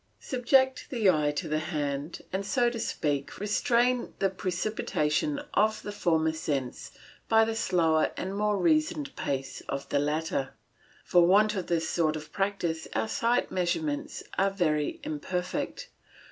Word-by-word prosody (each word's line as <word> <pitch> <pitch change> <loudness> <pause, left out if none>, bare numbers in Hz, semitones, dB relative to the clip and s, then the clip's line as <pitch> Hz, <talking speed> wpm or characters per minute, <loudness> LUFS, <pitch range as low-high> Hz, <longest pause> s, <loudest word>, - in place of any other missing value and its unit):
Subject 265 +2 +2
the 220 -7 +4
eye 150 -3 +1
to 160 +3 -3
the 155 0 0
hand, 145 0 -3
and, 195 +1 -1
so 240 +5 +2
to 235 - -5
speak, 145 -9 -2
restrain 240 +4 +1
the 195 -1 +1
precipitation 190 - -1
of 215 +1 +2
the 205 - -5
former 160 -6 +1
sense 140 -5 -3 0.4
by 225 0 +6
the 225 - -1
slower 165 -7 +2
and 190 +1 -3
more 210 0 +1
reasoned 310 - +1
pace 135 -1 -3
of 140 0 -3
the 140 - +2
latter. 150 -1 -1 0.5
For 175 -1 +5
want 210 +3 +5
of 190 -4 -3
this 165 -2 0
sort 155 -2 +1
of 155 0 -8
practice 195 -5 -1
our - - +1
sight 240 0 +1
measurements 290 - -2 0.2
are 195 +1 +4
very 170 - 0
imperfect. 190 -13 -3
190 Hz, 145 wpm, -28 LUFS, 155-230 Hz, 0.5 s, by